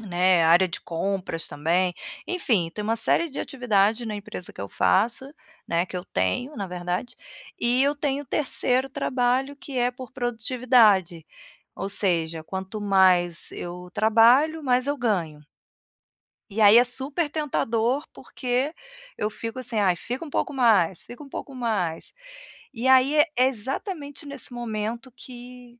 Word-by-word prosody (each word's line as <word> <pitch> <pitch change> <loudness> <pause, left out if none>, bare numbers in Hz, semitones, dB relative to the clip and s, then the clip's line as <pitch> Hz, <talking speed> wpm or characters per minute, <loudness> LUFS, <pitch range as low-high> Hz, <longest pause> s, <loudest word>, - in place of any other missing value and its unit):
né, 180 -4 +2
área 175 +3 +5
de - - -6
compras 175 -1 -3
também. 170 +5 0 0.3
Enfim, 220 - 0
tem 210 - -4
uma 225 +1 0
série 320 +9 +2
de - - -7
atividade 230 -4 +1
na 215 - -4
empresa 195 -3 -8
que - - -11
eu 100 - -5
faço, 235 +7 +1 0.4
né, 170 +1 +1
que 185 - -7
eu 180 - -5
tenho, 255 +3 -2
na 200 -2 -3
verdade, 180 +6 -4 0.5
e 245 +2 +3
eu 285 +1 +2
tenho 285 -1 -1
o - - -31
3º 260 -1 +1
trabalho 265 0 0
que 285 -4 -9
é 245 +1 +2
por 255 +1 -10
produtividade, 230 - +2 0.5
ou 195 - -4
seja, 165 -5 +1
quanto 190 +4 -6
mais 185 -4 +3
eu 180 +1 -7
trabalho 245 +9 +4
mais 255 0 +2
eu 285 +1 0
ganho. 175 - -2 1.1
E 215 +3 -2
aí 210 +2 +8
é 245 - +7
super 275 +6 -2
tentador, 265 -3 -1
porque 255 +4 -2 0.4
eu 210 - -1
fico 230 +3 -5
assim: 235 -3 -2
"Ai, 185 -3 +3
fica 250 - -5
um 310 - -8
pouco 285 - -2
mais, 205 -10 +3
fica 245 +5 -11
um - - -12
pouco 275 - -7
mais". 210 -10 -2 0.6
E 240 +2 -2
aí 260 +3 +5
é 300 - +6
é 255 - +5
exatamente 285 - -5
nesse 280 -3 -7
momento 235 +1 -4
que 245 0 -12
235 Hz, 155 wpm, -25 LUFS, 190-260 Hz, 1.1 s, aí